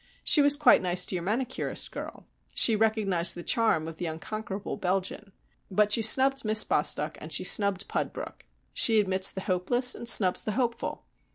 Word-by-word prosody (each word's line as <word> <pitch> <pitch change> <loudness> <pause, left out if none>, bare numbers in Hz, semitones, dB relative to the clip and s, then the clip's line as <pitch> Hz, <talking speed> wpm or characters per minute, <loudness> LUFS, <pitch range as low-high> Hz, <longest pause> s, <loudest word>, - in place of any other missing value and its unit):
She 300 - +4
was 285 0 +4
quite 295 0 +3
nice 180 0 0
to - - -5
your 175 - -5
manicurist 240 +7 -3
girl. - - -10 0.3
She 225 - +4
recognised 205 -5 0
the 175 - -9
charm 220 -9 0
of 165 -1 -10
the 175 - -5
Unconquerable 195 +5 -7
Belgian. 195 +2 -4 0.4
But 210 +2 0
she 225 - +3
snubbed 270 +5 +4
Miss 215 -1 +6
Bostock 150 +1 -2
and 155 - -10
she 145 - 0
snubbed 200 0 0
Pudbrook. - - -7 0.3
She 225 -2 +4
admits 190 -1 +1
the 190 - -8
hopeless 225 +8 +1
and 235 - -5
snubs 185 -5 +4
the 215 - -5
hopeful. 235 0 -4
205 Hz, 175 wpm, -26 LUFS, 180-230 Hz, 0.4 s, Miss